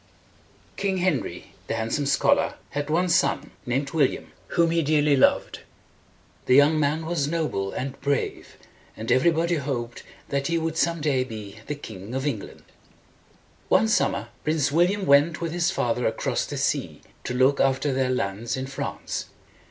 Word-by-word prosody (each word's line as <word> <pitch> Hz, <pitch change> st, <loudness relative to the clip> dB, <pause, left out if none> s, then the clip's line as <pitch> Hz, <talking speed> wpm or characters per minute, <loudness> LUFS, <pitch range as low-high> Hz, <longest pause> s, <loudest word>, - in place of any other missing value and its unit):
King 195 Hz, -1 st, 0 dB
Henry, 155 Hz, -, -2 dB
the -, -, -1 dB
Handsome 115 Hz, +6 st, -1 dB
Scholar, 140 Hz, 0 st, +2 dB, 0.2 s
had 145 Hz, +1 st, -3 dB
one 175 Hz, +4 st, +2 dB
son, 175 Hz, -, +1 dB, 0.2 s
named 135 Hz, +3 st, -1 dB
William, 150 Hz, -5 st, 0 dB, 0.2 s
whom 170 Hz, -1 st, +2 dB
he 165 Hz, 0 st, +2 dB
dearly 150 Hz, -1 st, +3 dB
loved. 130 Hz, -, +2 dB, 0.9 s
The 125 Hz, -, +5 dB
young 145 Hz, +3 st, +5 dB
man 155 Hz, +2 st, 0 dB
was 160 Hz, -4 st, 0 dB
noble 150 Hz, -12 st, -1 dB
and 135 Hz, +1 st, -5 dB
brave, 140 Hz, -1 st, -2 dB, 0.4 s
and 110 Hz, +2 st, -3 dB
every 130 Hz, +7 st, +5 dB
body 170 Hz, +1 st, +1 dB
hoped 125 Hz, -4 st, -4 dB, 0.3 s
that 140 Hz, 0 st, -1 dB
he 170 Hz, -, +1 dB
would 165 Hz, -1 st, -2 dB
some 170 Hz, -1 st, +1 dB
day 140 Hz, -4 st, +1 dB
be 110 Hz, -4 st, -8 dB
the 150 Hz, -, -2 dB
King 110 Hz, -4 st, -8 dB
of 135 Hz, +1 st, -2 dB
England. 120 Hz, -9 st, -4 dB, 1.1 s
One 220 Hz, -, +4 dB
summer 140 Hz, -, +1 dB
Prince 150 Hz, -3 st, +1 dB
William 180 Hz, +5 st, +2 dB
went 145 Hz, +3 st, +4 dB
with 170 Hz, -1 st, -3 dB
his 175 Hz, +1 st, +1 dB
father 125 Hz, -9 st, 0 dB
across 110 Hz, -, -1 dB
the -, -, -5 dB
sea -, -, -1 dB, 0.2 s
to 125 Hz, -, -3 dB
look 130 Hz, +2 st, +3 dB
after 135 Hz, +1 st, +2 dB
their 130 Hz, -1 st, +1 dB
lands 115 Hz, -1 st, -2 dB
in 130 Hz, -, -3 dB
France. 135 Hz, 0 st, -4 dB
140 Hz, 160 wpm, -25 LUFS, 130-165 Hz, 1.1 s, The